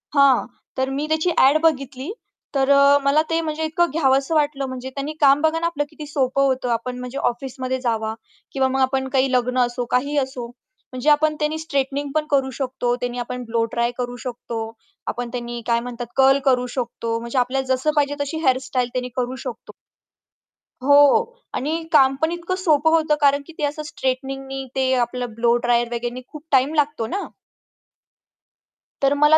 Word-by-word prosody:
हां, 275 Hz, -2 st, +5 dB, 0.3 s
तर 260 Hz, 0 st, 0 dB
मी 280 Hz, +2 st, -2 dB
त्याची 315 Hz, +3 st, +1 dB
ॲड 275 Hz, +4 st, +6 dB
बघितली. 275 Hz, -1 st, 0 dB, 0.4 s
तर 270 Hz, 0 st, +2 dB
अ, 280 Hz, 0 st, +6 dB
मला 280 Hz, +3 st, +4 dB
ते 330 Hz, -, +1 dB
म्हणजे 315 Hz, 0 st, -3 dB
इतकं 340 Hz, +2 st, +1 dB
घ्यावसं 275 Hz, 0 st, +2 dB
वाटलं 290 Hz, -2 st, +1 dB
म्हणजे 260 Hz, 0 st, -6 dB
त्यानी 285 Hz, +2 st, -3 dB
काम 280 Hz, 0 st, +6 dB
बघा 320 Hz, +1 st, +2 dB
ना 335 Hz, -, 0 dB
आपलं 305 Hz, -4 st, -1 dB
किती 305 Hz, -1 st, -9 dB
सोपं 275 Hz, -2 st, 0 dB
होतं 260 Hz, -2 st, 0 dB
आपण 240 Hz, +2 st, -2 dB
म्हणजे 250 Hz, +2 st, -6 dB
ऑफिसमध्ये 260 Hz, +1 st, -4 dB
जावा 220 Hz, -3 st, -1 dB, 0.4 s
किंवा 265 Hz, -1 st, +1 dB
मग 265 Hz, +1 st, -1 dB
आपण 265 Hz, 0 st, +1 dB
काही 265 Hz, 0 st, +2 dB
लग्न 250 Hz, 0 st, +1 dB
असो 240 Hz, 0 st, -4 dB
काहीही 280 Hz, +4 st, +1 dB
असो, 265 Hz, -3 st, -2 dB, 0.5 s
म्हणजे 255 Hz, +3 st, 0 dB
आपण 305 Hz, +1 st, +4 dB
त्यानी 305 Hz, +1 st, 0 dB
स्ट्रेटनिंग 285 Hz, -2 st, -2 dB
पण 310 Hz, -1 st, +1 dB
करू 270 Hz, -2 st, +2 dB
शकतो, 250 Hz, -2 st, -1 dB
त्यानी 245 Hz, 0 st, -4 dB
आपण 250 Hz, +1 st, -4 dB
ब्लोड्राय 230 Hz, +1 st, 0 dB
करू 245 Hz, -1 st, -3 dB
शकतो. 235 Hz, -2 st, -5 dB, 0.5 s
आपण 245 Hz, 0 st, -3 dB
त्यांनी 240 Hz, -1 st, -5 dB
काय 235 Hz, -1 st, +3 dB
म्हणतात 240 Hz, 0 st, -6 dB
कर्ल 270 Hz, +1 st, +5 dB
करू 250 Hz, -2 st, +3 dB
शकतो 230 Hz, -2 st, -2 dB
म्हणजे 235 Hz, +3 st, -5 dB
आपल्याला 265 Hz, +2 st, 0 dB
जसं 260 Hz, +4 st, +1 dB
पाहिजे 290 Hz, -1 st, +2 dB
तशी 285 Hz, +3 st, -3 dB
हेअरस्टाईल 255 Hz, -2 st, +1 dB
त्यांनी 250 Hz, 0 st, -2 dB
करू 250 Hz, 0 st, -2 dB
शकतो. -, -, -7 dB, 1.1 s
हो 285 Hz, +2 st, +4 dB, 0.6 s
आणि 315 Hz, +5 st, -2 dB
काम 270 Hz, -4 st, +5 dB
पण 320 Hz, +1 st, +2 dB
इतकं 345 Hz, +1 st, -3 dB
सोपं 320 Hz, -4 st, +3 dB
होतं 315 Hz, -2 st, +3 dB
कारण 285 Hz, 0 st, +4 dB
की 330 Hz, -, -12 dB
ते 300 Hz, -, -4 dB
असं 300 Hz, +1 st, -3 dB
स्ट्रेटनिंगनी 270 Hz, -1 st, -3 dB
ते 260 Hz, -1 st, +2 dB
आपलं 245 Hz, -1 st, -5 dB
ब्लो 235 Hz, +1 st, +2 dB
ड्रायर 240 Hz, 0 st, +3 dB
वगैरेंनी 240 Hz, +1 st, -4 dB
खूप 305 Hz, -1 st, -11 dB
टाईम 270 Hz, +2 st, +3 dB
लागतो 295 Hz, -6 st, 0 dB
ना? 395 Hz, -, -3 dB, 1.8 s
तर 275 Hz, +1 st, +4 dB
मला, 295 Hz, +2 st, +5 dB
270 Hz, 175 wpm, -22 LUFS, 250-295 Hz, 1.8 s, ॲड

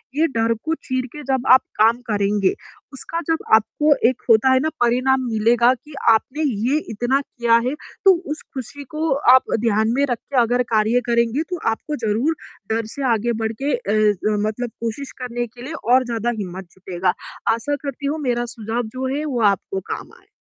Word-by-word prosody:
ये 320 Hz, +2 st, +3 dB
डर 225 Hz, 0 st, +2 dB
को 320 Hz, -, 0 dB
चीर 255 Hz, -1 st, -1 dB
के 300 Hz, -1 st, -8 dB
जब 265 Hz, -1 st, 0 dB
आप 260 Hz, -, +7 dB, 0.2 s
काम 225 Hz, +2 st, +5 dB
करेंगे 205 Hz, -1 st, +1 dB, 0.4 s
उसका 330 Hz, +5 st, -5 dB
जब 325 Hz, -, 0 dB
आपको 295 Hz, +7 st, +3 dB, 0.2 s
एक 255 Hz, -, -5 dB
होता 230 Hz, +4 st, +5 dB
है 260 Hz, -, +4 dB
ना 315 Hz, -, +1 dB
परिणाम 255 Hz, +2 st, +2 dB
मिलेगा 235 Hz, +3 st, +3 dB
कि 295 Hz, +4 st, -16 dB, 0.2 s
आपने 280 Hz, +7 st, -1 dB, 0.2 s
ये 295 Hz, +3 st, +2 dB
इतना 245 Hz, +6 st, 0 dB
किया 235 Hz, -4 st, +1 dB
है, 265 Hz, -, -1 dB, 0.3 s
तो 385 Hz, -, +9 dB, 0.2 s
उस 310 Hz, -, -4 dB
खुशी 275 Hz, +2 st, -6 dB
को 315 Hz, -1 st, 0 dB, 0.2 s
आप 260 Hz, -, +5 dB, 0.2 s
ध्यान 220 Hz, -1 st, +2 dB
में 280 Hz, +1 st, +3 dB
रख 240 Hz, -, 0 dB
के 275 Hz, -, -5 dB
अगर 245 Hz, +2 st, +2 dB
कार्य 220 Hz, +3 st, +3 dB
करेंगे 235 Hz, +5 st, +1 dB
तो 355 Hz, -, -2 dB
आपको 300 Hz, +7 st, -4 dB
ज़रूर 250 Hz, +10 st, +1 dB, 0.4 s
डर 225 Hz, 0 st, -1 dB
से 280 Hz, -, -4 dB
आगे 235 Hz, +2 st, 0 dB
बढ़ 220 Hz, -, 0 dB
के 285 Hz, -1 st, +1 dB
अ, 210 Hz, -2 st, +1 dB
मतलब 240 Hz, +2 st, -3 dB
कोशिश 235 Hz, +4 st, -4 dB
करने 240 Hz, -1 st, -3 dB
के 240 Hz, +2 st, -15 dB
लिए 310 Hz, +5 st, -6 dB, 0.2 s
और 255 Hz, 0 st, +5 dB
ज़्यादा 235 Hz, 0 st, -2 dB
हिम्मत 190 Hz, -1 st, -6 dB
जुटेगा। 185 Hz, -1 st, -2 dB, 0.4 s
आशा 235 Hz, +6 st, -2 dB
करती 280 Hz, +1 st, -5 dB
हूँ 310 Hz, +2 st, -2 dB
मेरा 240 Hz, 0 st, 0 dB
सुझाव 225 Hz, +2 st, -3 dB
जो 260 Hz, 0 st, -2 dB
है 300 Hz, +1 st, -2 dB
वो 250 Hz, -5 st, -2 dB
आपको 190 Hz, +2 st, -6 dB
काम -, -, -5 dB
आए। -, -, -29 dB
240 Hz, 190 wpm, -21 LUFS, 220-275 Hz, 0.4 s, तो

